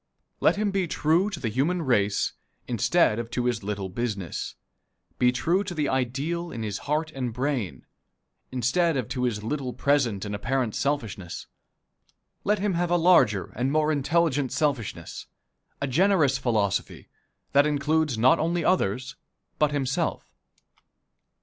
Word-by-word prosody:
Let - - +4
him 205 0 0
be 195 -2 0
true 165 +6 +2
to 195 -6 -6
the 120 - -2
human 155 +10 0
race 105 -7 +1 0.3
instead 120 - +2
of 115 -1 -4
to 120 +1 -2
his 120 -2 0
little 100 -1 -3
business 100 -3 -4 0.6
be 125 0 +5
true 165 +10 +1
to 185 -3 -6
the 150 -2 0
ideal 140 +7 -1
in 115 -6 -5
his 105 -2 -3
heart 155 +1 0
and 130 -4 -3
brain, 120 - -2 0.7
instead 135 +6 +1
of 125 -5 -2
to 125 -1 -1
his 105 -4 -2
little 130 +1 -3
present 125 -9 +1
and 105 - -4
apparent 120 +2 -1
selfishness 110 -11 -3 1.0
let 210 +1 +2
him 200 0 0
have 175 0 0
a 175 - +3
larger 165 - +4
and 125 +4 0
more 155 +1 +2
intelligent 145 -2 +1
selfishness 140 -6 -2 0.5
a - - -1
generous 145 -1 +3
philosophy, 105 -5 -1 0.4
that 140 +1 +5
includes 150 -2 +1
not 125 +4 +5
only 170 +2 0
others 130 - 0 0.4
but 150 - +4
himself. 135 -2 -2
135 Hz, 145 wpm, -26 LUFS, 115-160 Hz, 1.0 s, be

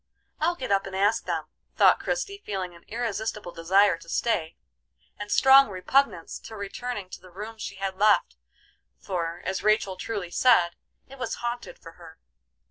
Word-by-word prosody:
I'll 335 +3 +1
get 255 -8 -5
up 195 0 +2
and 190 - -7
ask 205 +3 +2
them," - - -2 0.3
thought - - +5
Christie, 400 -5 -3
feeling 190 -3 -4
an 170 - -17
irresistible 220 -4 -3
desire 185 +2 +3
to 165 - -14
stay, 165 -6 -1 0.6
and 205 0 -6
strong 270 -1 +7
repugnance 190 0 0
to 220 - -10
returning 205 +1 -5
to - - -9
the 185 - -15
room 210 +5 -8
she 200 - -6
had 195 0 -3
left, 205 - +3 0.6
for, 170 -2 -4
as 190 - -2
Rachel 210 -3 +2
truly 190 -2 -4
said, 180 -6 +4 0.4
it 270 0 -13
was 255 - -3
haunted 240 0 -4
for 165 - -12
her. 160 -1 -13
200 Hz, 165 wpm, -26 LUFS, 180-235 Hz, 0.6 s, strong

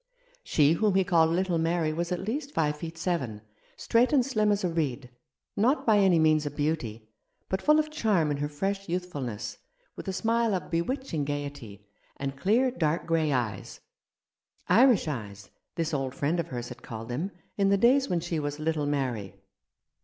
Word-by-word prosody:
She 150 0 +3
whom 205 +2 +1
he 190 - +4
called 170 -4 +3
little 175 0 +1
Mary 165 -1 +1
was 170 +2 -3
at 180 - -1
least 275 +8 -4
five 150 -2 +1
feet 165 +2 -7
seven, 140 - -2 0.4
straight 235 +2 +2
and 270 -5 +4
slim 215 -6 +1
as 205 -1 0
a - - +2
reed, 140 -7 -2 0.4
not 250 +8 +2
by 215 -3 +5
any 190 -4 +5
means 155 -1 +4
a - - 0
beauty, 145 -7 -3 0.4
but 190 - -1
full 300 0 +5
of 310 0 0
charm 205 - +1
in 145 - -1
her 145 +1 -2
fresh 195 +5 -3
youthfulness, 130 - -4 0.4
with - - -9
a - - 0
smile 225 +2 +1
of 180 - -5
bewitching 170 - -1
gaiety, 140 -8 -5 0.3
and 135 0 -4
clear, 225 - +2
dark 165 -7 -1
grey 160 -2 +1
eyes; 115 -7 -2 0.9
Irish 225 -1 +5
eyes, 100 -8 -6 0.2
this 165 -1 -2
old 135 -2 -2
friend 155 +6 0
of 170 - -2
hers 120 -3 -5
had 125 0 -10
called 115 0 -8
them, 150 +11 -2 0.3
in 200 -1 +2
the 200 - +4
days 265 +6 +4
when 175 -2 0
she 170 -1 -2
was 145 0 -3
little 155 -1 -1
Mary. 125 -9 -2
165 Hz, 185 wpm, -28 LUFS, 140-195 Hz, 0.9 s, by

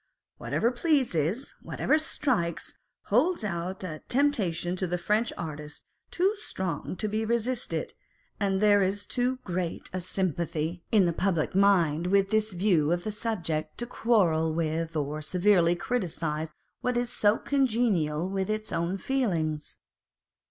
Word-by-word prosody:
Whatever 235 - 0
pleases, 250 - 0
what - - -8
ever 305 - +3
strikes, 250 - -1 0.3
holds 275 - +2
out 185 -1 -3
a 155 -4 -5
temptation 200 - +1
to 185 - -1
the 180 +1 -1
French 210 +6 +1
artist 150 -2 -7 0.2
too 385 +4 +1
strong 185 - -4
to 215 - -2
be 215 +1 -1
resisted, 235 +2 -1 0.5
and 195 -2 +1
there 205 -1 +5
is 200 +2 0
too 250 +3 0
great 180 -2 -3
a 185 - -2
sympathy 170 -2 -2
in 210 -4 +5
the 170 - +1
public 170 -3 0
mind 180 -5 +3
with 195 +1 +3
this 215 -1 +1
view 175 -5 +2
of 175 0 0
the 215 - -2
subject, 190 -8 -2
to 240 - -3
quarrel 180 -10 +2
with 165 0 -1
or 150 0 -2
severely 175 +1 +3
criticise 165 -7 -2 0.3
what 250 -1 0
is 245 0 0
so 210 +1 +3
congenial 215 - +1
with 195 0 -2
its 215 0 -2
own 170 +3 -1
feelings. 170 - -1
190 Hz, 145 wpm, -28 LUFS, 165-225 Hz, 0.5 s, there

